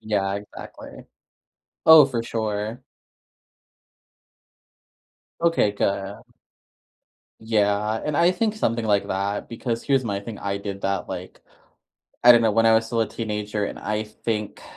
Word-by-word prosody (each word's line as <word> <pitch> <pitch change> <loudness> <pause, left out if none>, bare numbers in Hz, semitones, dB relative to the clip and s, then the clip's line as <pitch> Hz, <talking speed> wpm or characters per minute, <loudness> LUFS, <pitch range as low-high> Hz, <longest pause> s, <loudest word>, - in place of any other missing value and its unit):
Yeah, 100 -3 -1
exactly. 100 +1 -10 0.8
Oh, 160 -2 +10
for 120 -4 -3
sure. 110 +1 -3 2.6
Okay, 165 -11 +2
good. 100 0 -2 1.2
Yeah, 105 -1 +1
and 150 -1 -1
I 170 +2 +4
think 220 +2 -1
something 115 - -1
like 105 -2 +1
that, 100 +2 -2
because 115 0 -4
here's 135 -2 +1
my 100 -3 -2
thing, 105 +1 -8
I 100 0 -3
did 100 -1 -6
that, 100 -1 -2
like, - - -7 0.8
I 120 - +10
don't 120 - +5
know, 115 -1 +3
when 115 +2 +2
I 115 - +6
was 110 0 +2
still 115 0 0
a 110 - -2
teenager, 105 -2 -3
and - - -7
I 105 0 -2
think, 105 0 -5
110 Hz, 140 wpm, -23 LUFS, 100-115 Hz, 2.6 s, Oh